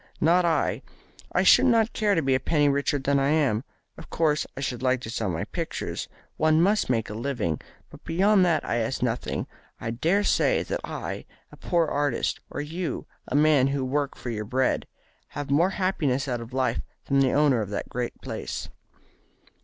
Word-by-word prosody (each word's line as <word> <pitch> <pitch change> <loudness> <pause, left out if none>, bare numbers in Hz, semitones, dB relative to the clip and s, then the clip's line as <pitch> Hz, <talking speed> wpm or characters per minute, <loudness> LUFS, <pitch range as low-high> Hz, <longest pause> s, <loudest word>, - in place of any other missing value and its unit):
"Not 175 +3 +4
I. 165 -2 +1 0.5
I - - +2
should - - +6
not 230 -2 +3
care 210 -2 +2
to 165 - +1
be 135 0 +2
a 130 - +3
penny 145 +2 +2
richer 140 +1 +1
than 140 +1 +1
I 135 +1 +2
am. 140 -8 +2 0.4
Of - - -11
course 155 -2 +1
I - - -3
should 125 -3 -3
like 130 0 +2
to 115 - -6
sell 110 -3 -2
my 85 -2 -2
pictures. - - -4 0.3
One 155 0 +3
must 200 +1 +2
make 115 -3 +1
a - - -5
living. 110 - -2 0.3
But - - -14
beyond 190 +4 +3
that 170 -3 +2
I 120 - 0
ask 120 +2 -1
nothing. 120 -1 -2 0.3
I 115 - -3
dare 170 - +1
say - - +2
that - - -3
I, - - -5 0.3
a - - -14
poor 170 -2 +1
artist, 145 -4 0
or - - -4
you, 165 +4 -4 0.2
a - - -3
man 145 -3 +5
who 135 -1 -1
work 140 +2 -1
for 120 - -5
your 105 -2 -3
bread, 130 +5 0 0.5
have 145 -1 -4
more 165 +6 +4
happiness 155 -9 0
out 120 -2 -2
of 115 +1 -9
life 130 0 0 0.2
than 140 0 +2
the 135 -2 +3
owner 145 -5 +3
of 105 - -4
that 100 - -4
great 125 0 -4
palace." - - -5
140 Hz, 195 wpm, -26 LUFS, 125-165 Hz, 0.5 s, should